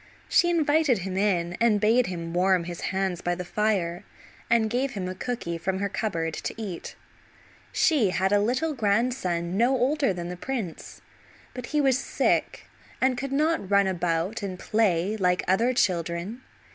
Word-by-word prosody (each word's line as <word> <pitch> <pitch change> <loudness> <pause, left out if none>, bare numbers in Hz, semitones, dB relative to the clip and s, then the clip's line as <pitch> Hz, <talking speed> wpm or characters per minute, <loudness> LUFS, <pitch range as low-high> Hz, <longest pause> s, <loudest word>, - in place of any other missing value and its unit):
She 345 - +4
invited 310 -5 +3
him 190 -1 -4
in, 180 -4 +1
and 225 -3 +4
bade 225 +4 +3
him 170 -2 -5
warm 185 0 +3
his 175 0 -7
hands 190 -2 -1
by 175 0 -1
the 180 0 -6
fire, 185 -4 -1 0.5
and 230 -2 +3
gave 255 +4 -1
him 190 -4 -4
a 185 - -3
cooky 185 -5 -4
from 190 +3 -1
her 200 +1 -1
cupboard 165 -6 -2
to - - -5
eat. 195 -6 -6 0.8
She 275 - +3
had 190 +1 0
a 205 - +4
little 255 +9 0
grandson 200 -6 0
no 245 +4 +3
older 270 0 +2
than 175 -1 -5
the 180 - -5
prince, 215 -3 -5 0.5
but 250 -2 -7
he 300 - 0
was 265 -2 +3
sick - - 0 0.3
and 260 0 +2
could 270 +2 -4
not 300 - +1
run 200 0 +4
about 180 +2 -1
and 190 -2 -4
play 205 -1 +1
like 180 -1 +1
other 225 +7 +3
children. 185 -1 -1
200 Hz, 170 wpm, -26 LUFS, 180-245 Hz, 0.8 s, She